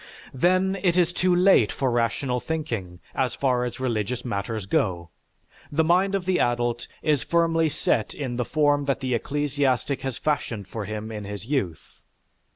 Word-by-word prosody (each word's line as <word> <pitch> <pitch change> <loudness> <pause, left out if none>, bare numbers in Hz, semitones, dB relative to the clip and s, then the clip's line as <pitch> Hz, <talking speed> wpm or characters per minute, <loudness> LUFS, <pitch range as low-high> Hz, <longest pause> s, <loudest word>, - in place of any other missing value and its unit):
Then 185 +7 +2
it 180 -2 +2
is 175 -1 +3
too 180 0 +2
late 180 - +5
for 130 +4 0
rational 120 +2 0
thinking, 115 - -4
as 130 -3 0
far 125 -3 +1
as 120 - -5
religious 120 -1 -2
matters 105 -2 -3
go, 85 -4 0 0.6
the 155 +2 +2
mind 185 +4 +3
of 190 -2 -2
the 185 -1 +2
adult 120 0 0 0.2
is 150 -4 +2
firmly 165 -1 +2
set 115 -6 0
in 130 -4 -3
the 125 - +1
form 145 +1 +2
that 140 -1 0
the 130 -1 -1
ecclesiastic 140 0 0
has 135 -3 -3
fashioned 120 -9 -2
for 110 0 -5
him 110 +2 -5
in 105 -2 -6
his 100 0 -6
youth. 105 - -3
130 Hz, 165 wpm, -25 LUFS, 115-155 Hz, 0.6 s, late